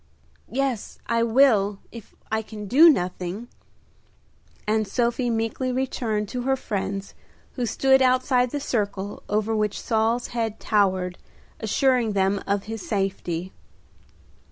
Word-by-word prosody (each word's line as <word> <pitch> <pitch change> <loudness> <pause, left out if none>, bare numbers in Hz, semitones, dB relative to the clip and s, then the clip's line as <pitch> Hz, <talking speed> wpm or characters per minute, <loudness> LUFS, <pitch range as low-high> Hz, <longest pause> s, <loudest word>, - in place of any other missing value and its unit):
"Yes, 265 -4 -2
I 230 0 +1
will, 225 -4 +4
if 230 -3 -12 0.2
I 220 0 +1
can 215 -1 -8
do 300 - +8
nothing;" 185 - -1 1.2
and 215 0 +1
Sophie 240 +3 0
meekly 225 +3 -1
returned 240 -5 -1
to 250 - -3
her 265 +2 +1
friends 200 -5 -4 0.4
who 245 -2 -2
stood 265 +3 +3
outside 255 -1 +3
the 290 - -3
circle 205 -6 -2
over 215 +1 0
which 210 -1 0
Saul's 225 +1 0
head 225 -2 -2
towered, 185 -4 +1 0.4
assuring 235 0 +2
them 195 0 +1
of 200 0 0
his 225 0 -6
safety. 190 -4 -2
220 Hz, 125 wpm, -24 LUFS, 200-250 Hz, 1.2 s, do